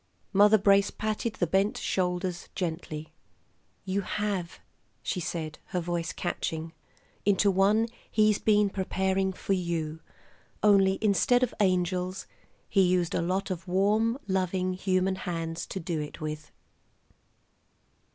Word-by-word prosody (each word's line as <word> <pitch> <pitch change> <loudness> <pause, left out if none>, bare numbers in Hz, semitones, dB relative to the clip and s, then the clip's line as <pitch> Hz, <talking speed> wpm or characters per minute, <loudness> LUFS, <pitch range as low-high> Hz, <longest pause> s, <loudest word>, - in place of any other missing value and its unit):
Mother 210 +2 +6
Brace 200 0 +4
patted 215 +1 -2
the 175 - +1
bent 195 +5 +1
shoulders 180 -1 -2
gently. 160 -3 -4 0.7
"You 195 +1 0
have," 195 -3 -3 0.4
she 185 - -2
said, 160 -2 -4
her 180 - -2
voice 170 -1 -2
catching, 165 -2 -3 0.5
"into 200 0 +3
one 205 +4 +3 0.2
He's 215 -1 +3
been 210 -2 +3
preparing 190 0 0
for 190 +1 -2
you. 165 -4 -2 0.6
Only 195 -2 +5
instead 220 +5 +3
of 250 - 0
angels 185 -1 0 0.4
He 195 - +3
used 180 -2 +2
a - - +1
lot 190 +3 -1
of 185 +1 -5
warm, 210 +6 +2
loving 185 -1 0
human 185 0 0
hands 165 -2 -4
to 190 - -5
do 165 -2 -2
it 150 +2 -7
with." 155 -1 -5
185 Hz, 125 wpm, -28 LUFS, 175-200 Hz, 0.7 s, Mother